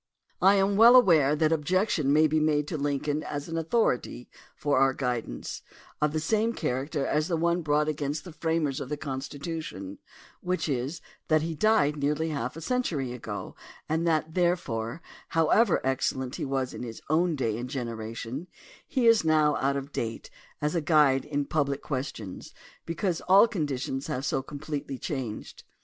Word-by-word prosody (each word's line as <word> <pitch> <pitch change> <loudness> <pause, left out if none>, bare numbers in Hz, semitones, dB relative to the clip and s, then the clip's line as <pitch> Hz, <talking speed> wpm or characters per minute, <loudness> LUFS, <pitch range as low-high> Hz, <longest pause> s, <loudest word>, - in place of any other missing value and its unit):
I 195 +2 +6
am 195 0 +2
well 235 +3 +8
aware 160 - +6
that 155 0 +2
objection 160 -1 +1
may 155 +2 +5
be 155 +1 +2
made 150 -1 +1
to - - -3
Lincoln, 145 +1 -1
as 145 -1 -5
an 165 - -5
authority 165 - 0 0.2
for 145 -3 +1
our 135 0 +3
guidance, 120 - -3 0.4
of 150 -1 +2
the 155 - -1
same 220 +7 +1
character 140 - -2
as 150 +1 +1
the 170 -3 0
one 170 +2 +1
brought 150 -1 +1
against 150 -1 -2
the 180 - -9
framers 160 -4 -1
of 130 - -6
the 150 - -2
Constitution, 140 - -6 0.4
which 180 -1 -1
is 135 +3 -2 0.3
that 155 -1 +3
he 165 0 -2
died 160 -5 +2
nearly 150 +3 0
half 140 -4 -3
a - - -7
century 160 - -1
ago 110 -4 -6 0.3
and 160 +2 0
that, 160 -1 +1
therefore, 170 -7 -1 0.3
however 165 +6 +3
excellent 130 -1 -1
he - - -3
was 135 -2 -2
in - - -7
his 115 -2 -6
own 165 +2 +2
day 115 -6 -1
and 120 +2 -5
generation, 115 +3 -5 0.4
he 260 -5 0
is 230 -4 +6
now 155 -2 +3
out 140 +1 +1
of 140 +1 -6
date 115 -3 -4 0.3
as 150 - +1
a 170 - +1
guide 145 -3 +4
in 145 -1 -1
public 140 -2 -1
questions 130 -8 -5 0.3
because 170 +1 -1
all 195 +4 +8
conditions 140 - -3
have 140 -3 -3
so 135 -3 0
completely 140 -1 -5
changed. 125 -6 -5
150 Hz, 170 wpm, -27 LUFS, 135-165 Hz, 0.4 s, well